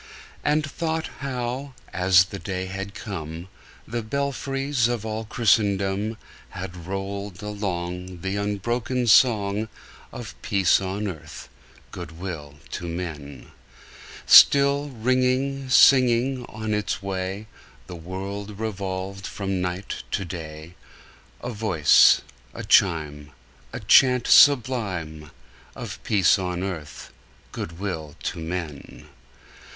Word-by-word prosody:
And 150 +1 +2
thought 160 +2 -3
how, 130 0 -4 0.2
as 90 0 +5
the 100 +1 -8
day 95 -2 -4
had 100 +2 -6
come, 85 -3 -7 0.4
The 115 +2 -3
belfries 135 +1 -1
of 120 -3 -3
all 110 0 -4
Christendom 100 -1 +1 0.3
Had 90 -2 -8
rolled 100 0 -5
along 90 -3 -4
The 95 +2 -2
unbroken 115 +5 -1
song 110 -2 +4 0.4
Of 110 -5 -8
peace 100 -3 +3
on 100 +2 -3
earth, 80 -4 -8 0.4
good 85 -3 -8
will 80 -6 -6 0.2
to 85 - -5
men! 75 -6 -7 0.7
Till, 140 +1 +7
ringing, 130 +2 0
singing 125 -1 +5
on 110 -1 -4
its 105 -1 -2
way, 95 +1 -4 0.4
The 90 - -9
world 100 +4 -6
revolved 100 -2 -4
from 95 -2 -3
night 90 +2 -4
to 95 - -2
day, 80 -1 -8 0.7
A 125 - -3
voice, 100 -9 +5 0.3
a - - -6
chime, 75 -4 +2 0.4
A - - -5
chant 125 -2 +5
sublime 100 - +3 0.5
Of 110 -3 -7
peace 100 -4 +3
on 90 -1 -3
earth, 85 -6 -7 0.4
good 85 0 -6
will 80 -7 -5
to - - -3
men! 80 -3 -6
100 Hz, 110 wpm, -24 LUFS, 90-120 Hz, 0.7 s, Till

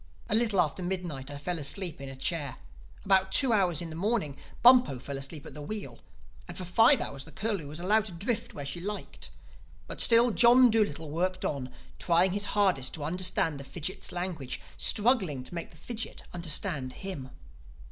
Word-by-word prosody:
A - - 0
little 220 -3 +2
after 175 +2 +1
midnight 175 -7 -4
I 145 - -7
fell 170 +4 -3
asleep 160 +2 -2
in 135 - -6
a 135 - -8
chair; 140 -1 -2 0.5
about 190 -1 +3
two 265 -4 +5
in 175 -5 0
the - - -7
morning 190 -5 -1 0.3
Bumpo 245 - +6
fell 140 +3 -6
asleep 140 +2 -5
at - - -9
the 150 - -9
wheel; 145 - -6 0.5
and - - -9
for 185 - -4
five 225 +10 +5
hours 135 -1 -5
the 160 - -13
Curlew 200 -3 -2
was 150 +3 -7
allowed 210 +4 +2
to 210 - -6
drift 205 +6 -3
where 145 - -6
she 170 +5 -5
liked. 205 +3 -6 0.6
But - - -3
still 235 +1 +6
John 245 +2 +6
Dolittle 165 -9 0
worked 185 +3 -1
on, 135 -3 -3 0.3
trying 175 +1 +3
his 205 +2 +1
hardest 185 -11 +2
to 155 - -7
understand 165 -2 0
the - - -7
fidgit's 145 +6 -5
language, 175 -7 -4 0.2
struggling 205 - +3
to 130 - -9
make 170 -1 -5
the 160 - -18
fidgit 225 +7 -6
understand 160 -5 -1
him. 180 -10 -7
175 Hz, 185 wpm, -29 LUFS, 145-205 Hz, 0.6 s, Bumpo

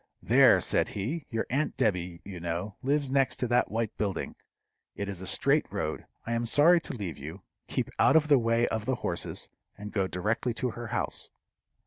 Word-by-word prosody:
"There," - - +6
said - - +1
he, 135 +11 -4
"your 115 -1 -1
aunt 145 +4 0
Debby, 90 -4 -1
you 95 -3 -7
know, 85 +4 -3
lives 140 0 0
next 135 -1 +2
to 125 - -2
that 125 0 +3
white 115 -1 -2
building. 100 -5 -2 0.6
It 100 - -4
is 95 -3 -5
a 95 - -5
straight - - +2
road. - - -3 0.2
I 115 - -2
am 115 0 -1
sorry 165 +7 +5
to - - -5
leave 95 - -5
you. 80 +7 -8 0.2
Keep - - -2
out - - +5
of 155 -1 +5
the 145 -3 +6
way 115 0 +2
of 110 -1 -3
the 130 - +2
horses, - - -1 0.3
and 105 0 -7
go 95 -3 +1
directly 110 +6 -1
to 125 +2 -1
her 120 +1 -7
house." - - -2
115 Hz, 195 wpm, -29 LUFS, 95-130 Hz, 0.6 s, There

